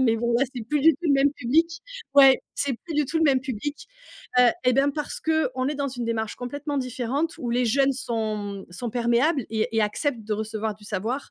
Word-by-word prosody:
Mais 230 -3 +3
bon, 235 +1 0 0.2
c'est 240 -3 -5
plus 295 +1 0
du 320 - +7
tout - - -13
le 300 - +3
même 275 +1 +4
public. 325 +7 +1 0.3
Ouais, 270 -2 +7
c'est 280 - -1
plus 330 - -5
du 300 - +2
tout 320 +4 -1
le - - +2
même 270 -4 +4
public. 285 +2 -5 0.5
Heu, 250 -1 +7 0.2
eh 250 - +4
ben, 275 +3 +3
parce 300 -1 -4
qu'on 275 -5 0
est 295 - -2
dans 280 -1 -2
une 245 -2 -5
démarche 220 -2 -2
complètement 285 +3 -4
différente 260 +5 -2
où 240 - -3
les 245 +1 +1
jeunes 275 +4 +3
sont, 225 -4 -2
mmh, 200 -2 -6
sont 240 +7 -4
perméables 240 +4 +1
et 220 -1 0
et 220 - +4
acceptent 225 +3 -1
de 215 - -3
recevoir 220 0 -3
du 205 +1 -18
savoir. 225 +8 -3
255 Hz, 225 wpm, -25 LUFS, 225-285 Hz, 0.5 s, du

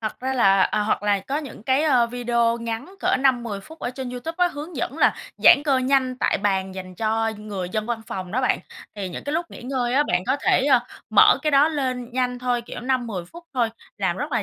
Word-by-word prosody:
thật 215 +1 -5
ra 260 +1 -1
là 195 -6 +4
à, 210 - +1
hoặc 210 - 0
là 205 -1 +2
có 275 +9 -3
những 270 -8 -9
cái, 265 +4 +2
ờ, 255 -6 +4
video 235 -1 0
ngắn 230 +10 -5
cỡ - - +2
5-10 240 -6 +1
phút 320 +9 -14
ở 245 - -3
trên 255 -1 -6
YouTube 285 +7 -5
á, 355 0 +4
hướng 300 +1 -8
dẫn 275 +4 -3
là - - +4 0.2
giãn 285 - +7
cơ 270 -3 +3
nhanh 255 -1 +1
tại - - +1
bàn 190 -2 -1
dành 185 -1 -8
cho 225 +2 0
người 200 -4 -5
dân 215 +3 -3
văn 235 -2 -2
phòng 185 -1 -5
đó 255 - +1
bạn. 255 - +2 0.4
Thì 195 -3 -4
những 175 - -7
cái 285 - -3
lúc 335 +2 -1
nghỉ - - -10
ngơi 250 -1 -1
á, 290 - +5
bạn 180 0 +1
có 260 +2 +2
thể, - - +3
ơ, 270 -4 +5 0.3
mở - - +6
cái 305 - +1
đó 285 +2 +5
lên 255 -5 -3
nhanh 250 -1 -1
thôi, 245 -1 -1
kiểu, 235 - -8
5 255 +1 0
đến 240 - -6
10 185 -6 -4
phút 340 - -13
thôi, 235 -3 +1 0.3
làm - - 0
rất - - -4
là - - +1
245 Hz, 255 wpm, -23 LUFS, 215-270 Hz, 0.4 s, giãn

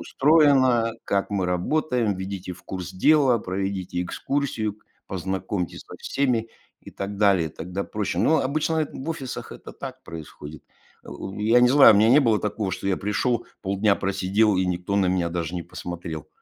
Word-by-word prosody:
устроено, 135 -6 +4
как 100 +1 -1
мы 100 -2 0
работаем, 115 - 0
введите 95 -1 -5
в 90 - -13
курс 90 -2 -6
дела, 135 +4 +4
проведите 95 -2 -3
экскурсию, 110 0 -2 0.3
познакомьте 95 0 -3
со - - -12
всеми",- 125 -5 0 0.3
и - - -12
так 100 +1 -5
далее, 100 -5 +3
тогда 90 +6 -5
проще. 105 -5 -3
Но 160 - +3
обычно 155 +4 0
эт 155 -2 0
в 135 - -6
офисах 135 -6 -6
это - - -11
так - - -9
происходит. 75 -2 -9 0.4
Э, - - -15 0.3
я 115 +4 +4
не 125 - +6
знаю, 135 -4 +8
у - - +4
меня 110 +2 +5
не 140 +4 +7
было 115 -6 +3
такого, 105 -1 -2
что 95 - -5
я 95 -1 +1
пришел, 115 +4 -1 0.2
полдня 100 +1 +1
просидел 100 +2 +1
и 95 - +2
никто 90 +2 -2
на 100 -2 +3
меня 90 -2 +1
даже 85 0 -3
не 85 - -3
посмотрел. 85 -3 -7
100 Hz, 170 wpm, -24 LUFS, 90-125 Hz, 0.4 s, знаю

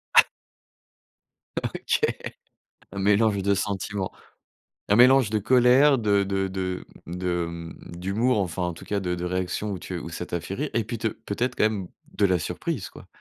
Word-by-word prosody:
Ah! - - +10 1.4
OK. - - -1 0.9
Un 100 - -5
mélange 105 +1 +3
de 100 0 +3
sentiments. 100 0 -2 0.8
Un 100 - +5
mélange 125 -1 +6
de 110 -1 +1
colère, 130 +5 +5
de 100 -3 +2
de 95 0 -1
de 95 0 -3 0.4
m 85 - -7
de 90 -1 -1
mmh, 85 0 -9
d'humour, 105 +6 +1
enfin, 90 -1 -2
en 90 -1 -1
tout - - -12
cas, 100 -1 -1
de 90 -2 -2
de 90 0 -4
réactions 90 +3 -2
où 95 - -4
tu 90 - -5
où 85 - -7
ça 90 +1 -5
t'a 85 - -3
fait 90 +4 -6
rire 145 +7 -2
et 115 - +1
puis 115 +1 -4
te 110 0 -1
peut-être, 120 +6 -3
quand - - +1
même, 100 -4 -4 0.3
de 100 - +2
la 90 -2 +3
surprise, - - -3
quoi? - - -14
100 Hz, 185 wpm, -25 LUFS, 90-110 Hz, 1.4 s, Ah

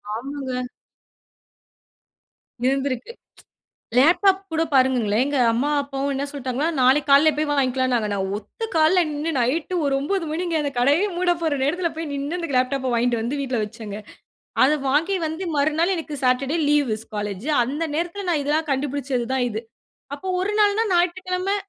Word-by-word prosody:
ஆமாங்க. 260 +1 -4 2.0
இருந்திருக்கு. 270 - -1 0.9
லேப்டாப் 370 +8 +5
கூட 320 0 +1
பாருங்கங்களேன், 250 -5 +3
எங்க 285 0 -1
அம்மா, 240 +5 0
அப்பாவும் 275 0 -3
என்ன 275 +1 -2
சொல்லிட்டாங்கன்னா, 275 +1 -2
நாளைக்கு 270 +4 +3
காலைல்ல 290 +3 +6
போய் 305 +1 0
வாங்கிக்கலாம்னாங்க. 255 -5 +1
நான் 190 -1 -2
ஒத்த 220 - -7
கால்ல 320 +4 +5
நின்னு 300 +2 -2
,நைட் 295 +9 0
ஒரு 280 -1 +1
9 365 +5 -1
மணிங்க. 340 +2 -2
அந்த 285 - -1
கடையே 285 +9 +3
மூட 355 0 +2
போற 315 -3 +1
நேரத்தில 335 +5 0
போய் 325 -1 -4
நின்னு 285 +5 -3
அந்த 335 - -4
லேப்டாப்ப 255 +1 0
வாங்கிட்டு 235 0 +1
வந்து 255 +6 -2
வீட்ல 260 -3 -2
வச்சேங்க. 210 -1 -8 0.7
அத 295 +4 +4
வாங்கி 320 +8 +2
வந்து 320 +4 -5
மறுநாள் 315 +6 +2
எனக்கு 315 -3 -5
சாட்டர் 255 +2 +2
டே - - +1
லீவ் 295 -3 +3
ஸ் - - -12
காலேஜு. 205 +5 -4
அந்த 285 +7 -3
நேரத்தில 350 +5 -3
நான் 315 -4 +1
இதெல்லாம் 305 +2 0
கண்டுபிடிச்சது 270 -3 -1
தான் 260 -2 +1
இது. 220 0 -4 0.5
அப்போ 335 +7 -9
ஒரு 395 +3 -1
நாள்னா, 415 +1 +3
ஞாயிற்றுக்கிழமை 365 +2 0
285 Hz, 155 wpm, -23 LUFS, 255-330 Hz, 2.0 s, காலைல்ல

